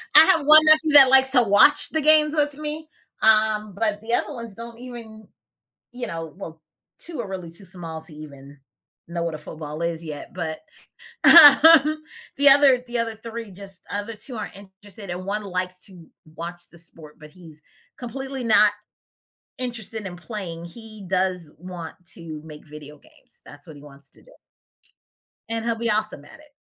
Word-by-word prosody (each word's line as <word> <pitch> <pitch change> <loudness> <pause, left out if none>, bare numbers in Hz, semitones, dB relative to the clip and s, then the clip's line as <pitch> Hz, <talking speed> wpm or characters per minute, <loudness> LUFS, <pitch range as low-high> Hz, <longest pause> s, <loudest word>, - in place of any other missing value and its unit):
I 310 +1 +9
have 325 -6 +2
1 310 +1 +8
nephew 310 0 +7
that 275 -3 +8
likes 265 0 +5
to 250 -3 +4
watch 205 +7 +4
the 315 - -2
games 305 +1 +5
with 290 -1 0
me, 305 +1 -7 0.3
um, 215 -1 +2
but 210 -1 -2
the 230 +2 -5
other 295 - -1
ones 230 -5 -9
don't 230 0 -11
even 230 -4 -11 0.7
you 245 0 -6
know? 165 -2 -7
Well, 160 -4 -10 0.4
2 325 -6 -7
are 220 - -5
really 185 -3 -8
too 175 +4 -9
small 165 -3 -5
to 160 - -5
even 145 -2 -13 0.5
know 170 0 -4
what 165 -2 -4
a - - -7
football 150 +1 -8
is 170 -1 -3
yet, 155 +7 -9
but, 165 -3 -5 0.6
um, 310 0 +7 0.3
the 285 +1 +5
other 275 -2 +5
the 240 - -3
other 230 -1 -3
3 225 -1 -9
just 195 0 -10
other 205 +2 -5
2 245 +3 -8
aren't 215 - -7
interested, 200 0 -12
and 180 +1 -6
1 205 +1 -4
likes 185 -1 -4
to 180 -4 -16 0.3
watch 175 +1 -7
the 170 - -15
sport, 160 -2 -10
but 155 -1 -14
he's 160 -4 -16 0.4
completely 265 +1 -7
not 210 -2 +4 0.9
interested 225 -4 -6
in 180 - -7
playing. 175 -4 -8
He 215 +2 -12
does 185 -3 -2
want 175 -1 -9 0.2
to 160 -3 -9
make 150 -1 -13
video 150 0 -12
games. - - -16
That's 145 0 -13
what 155 - -12
he 145 - -14
wants 140 -1 -12
to - - -18
do, - - -21 1.2
and 225 0 -4
he'll 230 -1 -1
be 230 0 -2
awesome 210 -9 -2
at 315 - -16
it. 305 -1 -21
205 Hz, 180 wpm, -22 LUFS, 170-245 Hz, 1.2 s, I